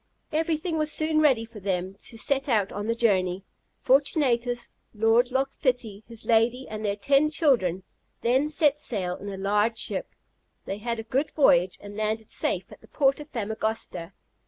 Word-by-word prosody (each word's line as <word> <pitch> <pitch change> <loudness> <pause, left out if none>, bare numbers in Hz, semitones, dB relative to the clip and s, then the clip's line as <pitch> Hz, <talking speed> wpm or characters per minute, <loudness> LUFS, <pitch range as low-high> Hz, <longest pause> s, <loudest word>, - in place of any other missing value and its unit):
Everything 320 +1 -1
was 305 0 0
soon 310 0 +1
ready 260 -7 +3
for 225 -1 -12
them 185 -1 -2
to 220 +3 -9
set 275 +4 0
out 210 -5 +2
on 205 +1 -4
the 230 - 0
journey. 190 -5 +1 0.4
Fortunatus, 250 -4 +2 0.3
Lord 225 +3 +3
Loch 265 +1 -1
Fitty, 230 -5 -2
his 230 -1 -8
lady, 235 +3 +2
and 215 0 -6
their 200 -1 0
ten 275 +8 +3
children, 235 - +2 0.4
then 260 +5 +2
set 295 -1 +4
sail 185 -10 -2
in 200 - -7
a 195 - -6
large 210 +3 +1
ship: - - -3 0.5
they 195 - -4
had 235 +2 -3
a 225 - -5
good 265 +6 -1
voyage, 180 - +4
and 205 0 -10
landed 215 +1 -2
safe - - -1
at - - -14
the - - -18
port 275 -1 +1
of 295 0 -10
Famagosta. 220 -5 -3
230 Hz, 175 wpm, -26 LUFS, 205-275 Hz, 0.5 s, set